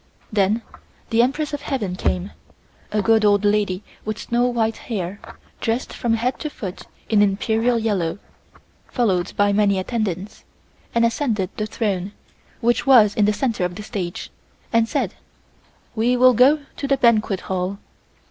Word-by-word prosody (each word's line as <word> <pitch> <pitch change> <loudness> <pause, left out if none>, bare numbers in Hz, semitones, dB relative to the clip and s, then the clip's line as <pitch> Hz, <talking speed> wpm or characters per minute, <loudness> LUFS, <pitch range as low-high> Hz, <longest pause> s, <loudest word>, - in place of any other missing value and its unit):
Then 210 +3 +2 0.5
the 225 +1 +4
Empress 295 +4 0
of 290 - -3
Heaven 215 -12 -2
came, 185 +1 -1 0.6
a 210 -1 0
good 225 +1 +4
old 205 0 +3
lady 205 -2 +1 0.2
with 215 0 -3
snow 240 +2 0
white 225 -2 0
hair, 200 -3 -4 0.4
dressed 230 +3 -2
from 235 -2 0
head 245 +3 -1
to 305 - -3
foot 195 -9 -7 0.2
in 215 -2 +3
Imperial 220 +4 +2
yellow, 200 -7 -1 0.7
followed 190 -7 0
by 205 0 +3
many 200 -1 +3
attendants, 195 -1 -3 0.5
and 235 0 +4
ascended 230 -6 0
the 215 - -2
throne, 200 -3 -2 0.5
which 240 +4 +1
was 225 -6 +7
in 210 - +2
the 210 - +3
center 230 -4 -1
of 180 0 -2
the 210 - -7
stage, 185 -5 -5 0.4
and 230 0 +3
said: - - -1 0.8
"We 240 +3 +2
will 255 +1 +6
go 270 +6 +5 0.2
to 285 - -3
the 275 0 +2
banquet 220 -6 +2
hall." 185 +1 -3
215 Hz, 155 wpm, -22 LUFS, 200-235 Hz, 0.8 s, was